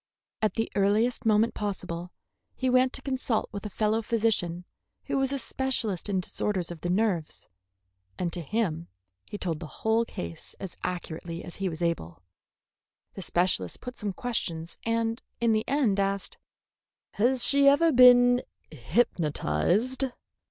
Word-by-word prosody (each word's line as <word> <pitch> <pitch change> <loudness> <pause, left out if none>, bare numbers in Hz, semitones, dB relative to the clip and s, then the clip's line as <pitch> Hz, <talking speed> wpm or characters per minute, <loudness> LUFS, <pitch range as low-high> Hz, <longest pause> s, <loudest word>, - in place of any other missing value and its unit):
At 215 - +1
the 225 - -1
earliest 210 +4 +2
moment 220 +2 +4
possible 180 -4 -4 0.4
he 260 -1 0
went 255 0 +4
to - - -3
consult 260 -4 -1
with 205 0 -5
a - - -7
fellow 215 +2 +1
physician 210 -7 0 0.4
who - - -3
was 270 -1 +1
a 280 - 0
specialist 235 -8 -2
in 190 -2 +1
disorders 185 -1 -1
of 165 -3 -8
the 175 - -2
nerves, 185 -5 0 0.7
and 175 -2 -2
to 175 - -2
him 170 -1 -1 0.4
he 205 - -6
told 165 -6 -2
the 165 - -7 0.2
whole 225 +1 +3
case 85 - -7
as 190 - -6
accurately 170 -1 -4
as 175 - -9
he 195 -1 -1
was 165 +1 -4
able. 95 - -2 0.9
The 195 - -7
specialist 175 - 0
put 250 0 -7
some 210 -2 -2
questions 170 -7 -3
and 230 0 -1 0.2
in 235 -1 +3
the 220 0 +1
end 255 -8 +2
asked: 195 0 -1 0.7
"Has 245 +3 +3
she 280 0 +5
ever 320 +4 +6
been 245 -1 +7 0.3
hypnotized?" 175 - +1
210 Hz, 150 wpm, -28 LUFS, 175-240 Hz, 0.9 s, been